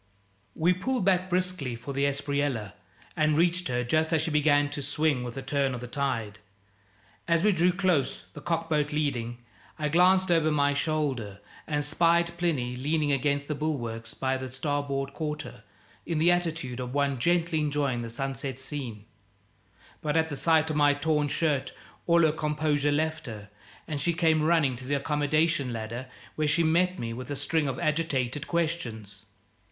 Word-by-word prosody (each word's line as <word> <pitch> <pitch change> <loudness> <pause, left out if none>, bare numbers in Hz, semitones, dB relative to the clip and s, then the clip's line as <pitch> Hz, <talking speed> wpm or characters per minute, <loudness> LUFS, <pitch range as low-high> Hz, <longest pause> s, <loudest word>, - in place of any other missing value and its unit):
We 170 +3 +3
pulled 225 +3 -1
back 185 -1 +2
briskly 180 -8 -1
for 120 +4 -7
the 140 +1 +1
Espriella 140 -6 -1 0.4
and 155 -1 +2
reached 175 +2 +2
her 125 -1 -1
just 155 +6 +1
as 160 -2 +2
she 160 - -2
began 145 -1 +3
to 145 - -4
swing 140 -1 0
with 120 -1 -6
the 135 - -5
turn 135 -1 0
of - - -5
the 125 - -7
tide. 120 -6 -2 0.9
As 170 0 +2
we 210 - +5
drew 180 -1 +3
close 180 -6 0
the 150 - -9
cockboat 165 -3 0
leading 130 -6 -1 0.4
I 150 -1 -1
glanced 185 +3 +4
over 165 -2 +3
my 145 -1 +2
shoulder 140 -9 -1 0.3
and 150 -1 -1
spied 170 +2 +2
Plinny 135 -8 0
leaning 150 +3 0
against 140 +1 0
the 150 - -1
bulwarks 120 -7 -3
by 130 0 0
the 130 0 -6
starboard 140 0 -2
quarter, 150 -6 -5 0.4
in 170 - -2
the 165 +3 +4
attitude 165 -8 -1
of 125 +1 -5
one 140 -2 +1
gently 170 +2 +2
enjoying 145 -4 0
the 115 - -5
sunset 135 +1 -3
scene; 130 -6 -6 1.0
but 150 +1 0
at 160 0 +2
the 145 - -3
sight 160 +1 +3
of - - -2
my 145 -1 +4
torn 150 0 +1
shirt 145 -2 0 0.3
all 170 0 +5
her 155 - +5
composure 150 -1 0
left 155 +1 -1
her, 105 -3 -8 0.4
and 150 -3 -3
she 170 - +1
came 160 -2 +3
running 155 -5 +3
to 125 +1 -9
the 145 - +1
accommodation 150 0 +1
ladder, 115 +3 -5 0.3
where 155 -1 0
she 150 +3 +3
met 180 +3 +2
me 115 -1 -4
with 125 +3 -7
a 145 - -2
string 150 +2 0
of 130 -2 -2
agitated 150 -3 -1
questions. 115 - -3
145 Hz, 175 wpm, -28 LUFS, 130-160 Hz, 1.0 s, we